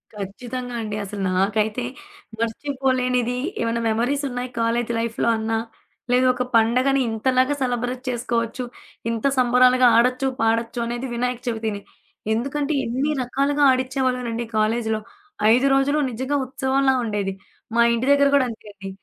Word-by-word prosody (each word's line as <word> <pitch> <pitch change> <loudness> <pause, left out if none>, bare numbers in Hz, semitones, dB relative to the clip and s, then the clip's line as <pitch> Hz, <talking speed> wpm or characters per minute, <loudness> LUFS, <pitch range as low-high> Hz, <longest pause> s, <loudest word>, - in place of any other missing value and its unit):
ఖచ్చితంగా 245 +5 -6
అండి. 215 -1 -4
అసల 200 +1 -7 0.2
నాకైతే 210 +4 +1 0.6
మర్చిపోలేనిది 250 0 0 0.2
ఏమన్నా 230 0 0
మెమోరీసున్నాయి 250 +2 -1
కాలేజీ 230 +1 0
లైఫ్‌లో 230 0 -1
అన్నా, 225 0 -1 0.5
లేదు 250 +1 +4
ఒక 250 - -1
పండగని 255 +5 +3
ఇంతలాగా 255 +5 +1
సెలబ్రేట్ 245 0 -2
చేసుకోవచ్చు. 235 0 -2 0.5
ఇంత 230 +1 -3
సంబరాలుగా 250 0 +5
ఆడొచ్చు, 250 +3 +2
పాడొచ్చు 230 +1 0
అనేది 240 +2 -3
వినాయక‌చవితినే. 235 -3 -2 0.5
ఎందుకంటే 280 +6 -1
ఎన్ని 265 +6 -1
రకాలుగా 280 +3 0
ఆడిచ్చేవాళ్ళోనండి 255 -2 -1
కాలేజీలో. 220 0 0 0.5
5 255 +3 +3
రోజులు 285 +2 +2
నిజంగా 260 +5 -1
ఉత్సవంలా 265 0 +1
ఉండేది. 205 -3 -2 0.4
మా 235 - +5
ఇంటి 235 +3 -1
దగ్గర 280 0 +5
గూడా 270 - +4
అంతే 220 -1 -10
అండి. 195 -1 -8
245 Hz, 120 wpm, -22 LUFS, 230-260 Hz, 0.6 s, సంబరాలుగా